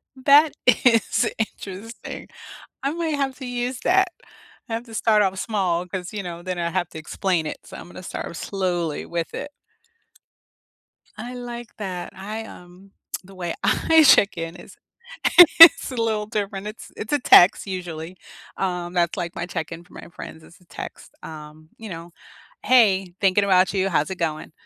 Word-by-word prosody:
That 285 Hz, +3 st, +5 dB
is 230 Hz, -2 st, +3 dB
interesting. 215 Hz, +1 st, -6 dB, 0.6 s
I 275 Hz, +2 st, -1 dB
might 330 Hz, -2 st, -2 dB
have 270 Hz, -2 st, -2 dB
to 265 Hz, -, -7 dB
use 245 Hz, 0 st, -3 dB
that. 380 Hz, +1 st, +3 dB, 0.6 s
I -, -, -7 dB
have 230 Hz, +2 st, -4 dB
to 225 Hz, -, -13 dB
start 215 Hz, -1 st, +3 dB
off 190 Hz, -1 st, -1 dB
small 185 Hz, -5 st, -1 dB
'cause, 180 Hz, +1 st, -6 dB
you 205 Hz, -, -3 dB
know, 175 Hz, -2 st, -7 dB
then 185 Hz, -1 st, -4 dB
I 170 Hz, 0 st, -1 dB
have 180 Hz, -1 st, -1 dB
to 160 Hz, -, -9 dB
explain 175 Hz, +1 st, -1 dB
it. -, -, -5 dB
So, -, -, -11 dB
I'm -, -, -11 dB
gonna 175 Hz, -, -11 dB
start 170 Hz, -, -6 dB
slowly 175 Hz, -6 st, -2 dB
with 170 Hz, -1 st, -4 dB
it. 290 Hz, -, -6 dB, 1.7 s
I 245 Hz, +1 st, -7 dB
like 240 Hz, -1 st, -8 dB
that. 185 Hz, -4 st, -6 dB
I, 215 Hz, +3 st, -6 dB
um 180 Hz, +1 st, -15 dB, 0.3 s
the 195 Hz, +1 st, -15 dB
way 180 Hz, -2 st, -4 dB
I 320 Hz, -1 st, +4 dB
check-in 180 Hz, -, +3 dB
is 175 Hz, -, -14 dB, 0.8 s
is 330 Hz, -4 st, +9 dB
a 255 Hz, -, -6 dB
little 220 Hz, -2 st, -1 dB
different. 205 Hz, -2 st, -4 dB
It's 215 Hz, +2 st, -10 dB
it's 215 Hz, -, -5 dB
a 290 Hz, -, +3 dB
text, 195 Hz, -6 st, +6 dB
usually, 175 Hz, -2 st, -6 dB, 0.4 s
um, 180 Hz, -2 st, -3 dB
that's 170 Hz, -2 st, +1 dB
like 170 Hz, -1 st, -4 dB
my -, -, -3 dB
check-in 170 Hz, -1 st, -6 dB
for -, -, -22 dB
my -, -, -11 dB
friends, 160 Hz, -, -10 dB
it's 170 Hz, -, -18 dB
a 180 Hz, -, -25 dB
text, -, -, -10 dB
um, 155 Hz, 0 st, -11 dB
you 220 Hz, -, -9 dB
know? 170 Hz, -1 st, -9 dB, 0.5 s
"Hey, 195 Hz, -8 st, +3 dB
thinking 195 Hz, 0 st, +3 dB
about 185 Hz, -1 st, +3 dB
you. 195 Hz, 0 st, +1 dB
How's 160 Hz, -3 st, 0 dB
it 190 Hz, -, -5 dB
going?" 155 Hz, -2 st, -3 dB
190 Hz, 175 wpm, -23 LUFS, 175-230 Hz, 1.7 s, is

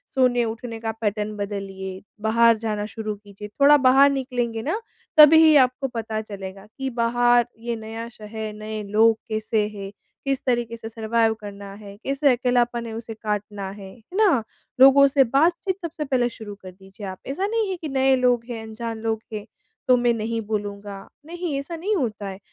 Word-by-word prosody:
सोने-उठने 240 Hz, -2 st, 0 dB
का 225 Hz, -1 st, -2 dB
पैटर्न 210 Hz, 0 st, -1 dB
बदलिए 195 Hz, -2 st, -5 dB, 0.2 s
बाहर 230 Hz, +1 st, +4 dB
जाना 210 Hz, -2 st, -3 dB
शुरू 215 Hz, -1 st, -5 dB
कीजिए। 205 Hz, 0 st, -11 dB
थोड़ा 280 Hz, +7 st, +5 dB
बाहर 270 Hz, +1 st, +6 dB
निकलेंगे 245 Hz, -4 st, -2 dB
न 345 Hz, +8 st, 0 dB, 0.4 s
तभी 315 Hz, +1 st, +8 dB
आपको 260 Hz, +1 st, +2 dB
पता 225 Hz, -3 st, -4 dB
चलेगा 195 Hz, -2 st, -8 dB
कि 270 Hz, 0 st, -2 dB
बाहर 240 Hz, 0 st, +3 dB
ये 235 Hz, +1 st, -3 dB
नया 225 Hz, +1 st, -7 dB
शहर, 215 Hz, -1 st, -7 dB
नए 215 Hz, 0 st, -6 dB
लोग 220 Hz, +2 st, +3 dB
कैसे 215 Hz, -1 st, 0 dB
हैं? 195 Hz, -1 st, -7 dB, 0.3 s
किस 275 Hz, 0 st, -1 dB
तरीक़े 240 Hz, -2 st, 0 dB
से 225 Hz, -1 st, -8 dB
सर्वाइव 225 Hz, 0 st, +1 dB
करना 200 Hz, -1 st, -9 dB
है? 200 Hz, -1 st, -11 dB
कैसे 275 Hz, +1 st, +2 dB
अकेलापन 240 Hz, -1 st, +1 dB
है 225 Hz, -, -6 dB
उसे 225 Hz, 0 st, -6 dB
काटना 210 Hz, -2 st, -4 dB
है? 195 Hz, -1 st, -10 dB
है 240 Hz, -, -20 dB, 0.2 s
ना? 370 Hz, -, +4 dB, 0.4 s
लोगों 275 Hz, +1 st, +8 dB
से 275 Hz, 0 st, +4 dB
बातचीत 335 Hz, +9 st, +1 dB
सबसे 320 Hz, -2 st, -4 dB
पहले 255 Hz, -3 st, +1 dB
शुरू 220 Hz, -3 st, -9 dB
कर 185 Hz, -, -9 dB
दीजिए 190 Hz, +2 st, -12 dB
आप। 185 Hz, 0 st, -6 dB
ऐसा 320 Hz, +9 st, -1 dB
नहीं 445 Hz, -1 st, 0 dB
है 380 Hz, -, -1 dB
कि 310 Hz, -, -4 dB
नए 265 Hz, 0 st, +3 dB
लोग 245 Hz, -2 st, +2 dB
हैं, 230 Hz, -2 st, -5 dB
अनजान 225 Hz, +1 st, -6 dB
लोग 220 Hz, -1 st, -2 dB
हैं 210 Hz, -1 st, -5 dB, 0.4 s
तो 255 Hz, -, +6 dB
मैं 240 Hz, -1 st, +2 dB
नहीं 225 Hz, 0 st, -2 dB
बोलूँगा, 205 Hz, -2 st, -5 dB, 0.2 s
नहीं 340 Hz, -2 st, -4 dB
ऐसा 285 Hz, +5 st, -6 dB
नहीं 390 Hz, +6 st, -1 dB
होता 215 Hz, -, -2 dB
है। 190 Hz, 0 st, -7 dB
230 Hz, 180 wpm, -23 LUFS, 210-265 Hz, 0.4 s, तभी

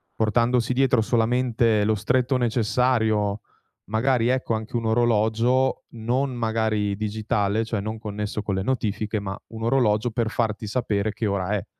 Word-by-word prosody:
portandosi 115 Hz, +2 st, +1 dB
dietro 130 Hz, -2 st, +3 dB
solamente 115 Hz, -1 st, +2 dB
lo 110 Hz, 0 st, +2 dB
stretto 125 Hz, +5 st, +1 dB
necessario, 110 Hz, -3 st, +1 dB, 0.5 s
magari, 115 Hz, +3 st, +1 dB
ecco, 130 Hz, -2 st, 0 dB
anche 110 Hz, +2 st, -4 dB
un 115 Hz, -, -3 dB
orologio 115 Hz, +3 st, +2 dB
non, 125 Hz, +4 st, -1 dB
magari, 110 Hz, -3 st, 0 dB
digitale, 105 Hz, 0 st, -1 dB
cioè 110 Hz, -2 st, -2 dB
non 110 Hz, +2 st, -4 dB
connesso 105 Hz, -1 st, -4 dB
con 100 Hz, -2 st, -2 dB
le 95 Hz, -, -1 dB
notifiche, 110 Hz, -3 st, -1 dB
ma, 95 Hz, -1 st, -5 dB
un 110 Hz, 0 st, -8 dB
orologio 115 Hz, -2 st, +2 dB
per 115 Hz, -1 st, -1 dB
farti 110 Hz, -2 st, -2 dB
sapere 105 Hz, -2 st, -1 dB
che 110 Hz, +1 st, -3 dB
ora 100 Hz, -1 st, -1 dB
è. 105 Hz, -3 st, -1 dB
110 Hz, 150 wpm, -24 LUFS, 105-120 Hz, 0.5 s, dietro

